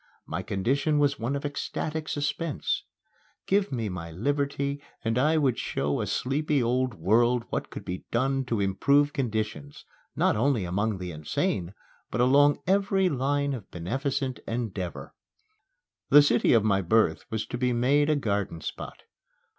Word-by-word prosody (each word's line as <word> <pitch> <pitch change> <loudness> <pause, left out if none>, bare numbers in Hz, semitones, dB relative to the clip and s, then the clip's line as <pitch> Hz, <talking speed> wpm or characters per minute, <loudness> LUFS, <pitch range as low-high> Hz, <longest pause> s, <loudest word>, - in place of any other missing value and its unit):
My - - -3
condition 135 +10 0
was 145 -1 +2
one 120 +5 -1
of 140 - -4
ecstatic 155 +2 -3
suspense. 145 +1 -2 0.6
Give 200 +1 +1
me 115 -4 -2
my 90 -3 -5
liberty 140 - -1 0.2
and 115 0 +1
I 150 +6 +3
would 135 -6 +1
show 70 +1 -1
a - - -2
sleepy 140 +1 0
old 125 0 0
world 115 +7 +2
what - - -2
could - - -8
be 90 +1 -5
done 135 +3 +1
to 115 -4 -1
improve 140 +10 +2
conditions, 110 - -3 0.3
not - - +2
only 115 -2 +1
among 100 +4 -1
the 90 -1 -5
insane, 85 +4 -2 0.3
but - - -3
along 145 +4 +4
every 195 0 +2
line 140 0 0
of 115 -7 -7
beneficent 135 - -2
endeavor. 105 -7 -4 1.0
The 145 - +8
city 120 -4 +3
of 115 -3 +4
my 100 -2 +2
birth 110 +5 +2
was 110 -1 -2
to 120 - -5
be 125 0 +1
made 135 +5 +2
a 155 - +4
garden 100 - -1
spot. - - -7
125 Hz, 155 wpm, -27 LUFS, 105-145 Hz, 1.0 s, The